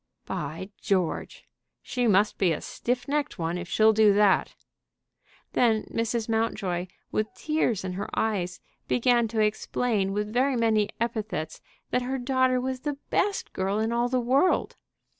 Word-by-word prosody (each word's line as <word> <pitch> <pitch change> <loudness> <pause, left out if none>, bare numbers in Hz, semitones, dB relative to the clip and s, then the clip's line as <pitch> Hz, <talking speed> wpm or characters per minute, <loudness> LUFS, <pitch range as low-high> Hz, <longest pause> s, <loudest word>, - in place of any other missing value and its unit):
"By 160 +7 -5
George! 185 -4 -1 0.4
she 245 -1 -1
must 210 0 +3
be 185 -3 +3
a - - -3
stiff 245 +1 -3
necked 290 -3 -1
one 165 -1 -2
if 175 0 -7
she'll 220 0 +5
do 215 -1 +5
that." 205 -2 +3 1.0
Then 225 -3 +3
Mrs. 230 0 -1
Mountjoy, 200 -6 -1 0.2
with 215 0 -1
tears 305 -10 0
in 185 -1 -3
her 195 +3 -4
eyes, 190 -5 -1 0.3
began 240 -1 +3
to 220 0 -3
explain 210 -1 0
with 210 +1 -2
very 260 +2 +2
many 220 -3 +2
epithets 215 -9 -3 0.3
that 250 - +2
her 260 +2 -2
daughter 260 0 +2
was 260 0 -3
the 290 +1 -3
best 405 -1 0
girl 195 +2 -1
in 220 +1 0
all 240 +1 +1
the 255 0 +1
world. 265 +9 +2
220 Hz, 155 wpm, -27 LUFS, 200-250 Hz, 1.0 s, she'll